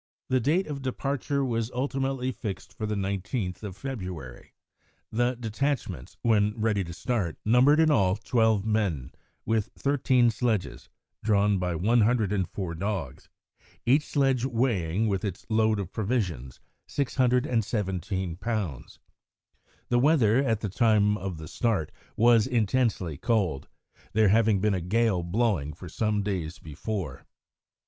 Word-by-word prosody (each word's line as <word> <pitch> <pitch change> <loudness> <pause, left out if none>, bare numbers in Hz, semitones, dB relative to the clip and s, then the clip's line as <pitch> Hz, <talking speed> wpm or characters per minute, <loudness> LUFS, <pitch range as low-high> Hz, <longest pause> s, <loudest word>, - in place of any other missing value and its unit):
The 130 - +3
date 160 +10 +2
of 145 -2 -5
departure 140 +1 -1
was 115 -2 -1
ultimately 135 -1 -1
fixed 105 -6 -6
for 110 - -3
the 105 - -1
19th 95 0 -3
of 100 -3 -7
February. 90 - -7 0.6
The 120 +2 +1
detachments, 115 - -3
when 105 -1 +2
ready 110 -3 +1
to 85 - -7
start, 95 -1 -2
numbered, 125 +7 +5
in 160 -1 +5
all, 95 -9 +3
twelve 110 -2 +1
men, 100 - 0 0.3
with 110 -1 0
thirteen 130 -4 +3
sledges, 110 -3 -2 0.3
drawn 105 -2 +3
by 90 -1 -1
104 105 -3 +1
dogs, 90 -6 -4 0.6
each 140 +5 +4
sledge 135 -4 +1
weighing, 115 -6 0
with 100 -1 -1
its 100 -4 -4
load 110 -1 +3
of 95 - -5
provisions, 95 - -2 0.3
617 110 - 0
lbs. 100 - -4 0.9
The 120 - +3
weather, 130 -5 +4
at 115 -5 0
the 105 - -2
time 105 0 +3
of 95 -4 -5
the 80 0 -8
start, 95 - -1 0.2
was 115 0 +5
intensely 115 - 0
cold, 95 - 0 0.5
there 110 -1 +4
having 110 -1 +4
been 105 0 +2
a 95 - -1
gale 105 +1 +1
blowing 85 -5 0
for - - -10
some 105 -2 -1
days 90 -4 -3
before. 80 - -5
110 Hz, 130 wpm, -27 LUFS, 95-120 Hz, 0.9 s, numbered